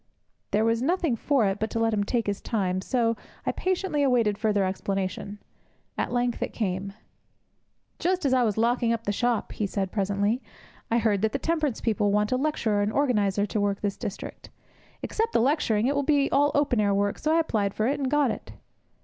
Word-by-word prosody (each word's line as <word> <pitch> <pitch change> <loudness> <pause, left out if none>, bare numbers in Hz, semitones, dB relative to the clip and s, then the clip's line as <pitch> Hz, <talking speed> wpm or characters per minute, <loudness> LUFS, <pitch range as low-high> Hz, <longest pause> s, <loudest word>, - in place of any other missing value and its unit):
There 215 +2 +2
was 230 0 +1
nothing 330 -2 +1
for 265 0 +1
it 195 0 0
but 220 - -1
to 230 - -2
let 225 0 +2
him 205 -1 +1
take 230 +2 -1
his 200 -1 -2
time, 185 -4 -1
so 230 +1 +1 0.3
I - - +1
patiently 370 -5 -1
awaited 240 -6 +3
further 205 -2 +1
explanation. 195 +1 -3 0.6
At - - -2
length 245 -1 0
it - - -2
came. 195 -2 -2 1.1
'Just 360 -1 0
as 265 - +3
I 255 - +4
was 220 -4 +1
locking 235 +1 +2
up 230 -1 -1
the 205 - -1
shop,' 240 +2 0
he 210 - -2
said, 195 -1 -2
presently, 205 +4 0 0.5
'I 230 - +2
heard 215 -4 +1
that 220 0 +1
the - - +1
temperance 305 -3 -1
people 210 -3 +1
wanted 210 +3 +1
a - - +2
lecturer 250 -8 0
and 205 +1 0
organizer 210 -7 +1
to 210 0 -2
work 200 -1 0
this 200 -1 -1
district. 200 - -7 0.5
Except 450 +1 -1
the - - +4
lecturing, 235 -4 +2
it 275 - +2
will 285 - +1
be 280 -1 +2
all 290 +1 +4
open 285 -5 +2
air 200 -1 +2
work, 200 0 0
so 310 - 0
I - - +4
applied 210 -11 0
for 215 - 0
it, 280 +4 0
and 270 -2 -1
got 290 -3 +2
it!' - - -8
225 Hz, 210 wpm, -26 LUFS, 205-270 Hz, 1.1 s, I